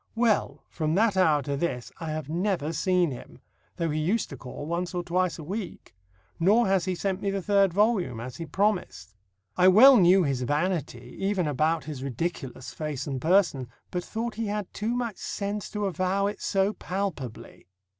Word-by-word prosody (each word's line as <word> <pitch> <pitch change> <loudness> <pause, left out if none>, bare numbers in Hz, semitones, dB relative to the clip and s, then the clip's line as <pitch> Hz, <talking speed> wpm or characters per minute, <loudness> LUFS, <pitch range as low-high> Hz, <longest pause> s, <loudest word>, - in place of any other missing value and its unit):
Well, 225 -3 +1
from 155 -1 -2
that 215 0 +3
hour 155 -6 +3
to 140 +1 -2
this 135 -5 -3
I 165 -1 -5
have 155 -2 -4
never 170 -1 -1
seen 180 -3 +2
him, 125 - -10 0.4
though 170 -3 -1
he 155 - -1
used 190 +8 0
to - - -5
call 130 +3 -8
once 175 +3 -3
or 175 - -1
twice 180 0 0
a 160 - -8
week; 190 +4 -6 0.5
nor 210 +8 +4
has 190 -3 +2
he 185 - -1
sent 195 +1 -2
me 200 - 0
the 195 0 -1
third 200 0 +3
volume, 195 - +1
as 125 +2 -7
he 165 -1 -6
promised. 180 - -1 0.4
I 180 - +5
well 245 +8 +9
knew 185 0 +6
his 135 -4 -1
vanity, 145 -4 -2
even 195 -2 0
about 155 +3 +1
his 145 -3 -7
ridiculous 135 -1 -4
face 150 -4 -4
and 135 -4 -4
person, 165 -7 +2 0.2
but 180 -1 -2
thought 230 +3 -4
he 225 0 -3
had 205 -2 -4
too 225 +3 -2
much 235 -5 -3
sense 205 0 -4
to 210 -1 -3
avow 190 +2 0
it 205 +1 -3
so 195 +1 +1
palpably. 180 - -5
180 Hz, 185 wpm, -27 LUFS, 150-200 Hz, 0.5 s, well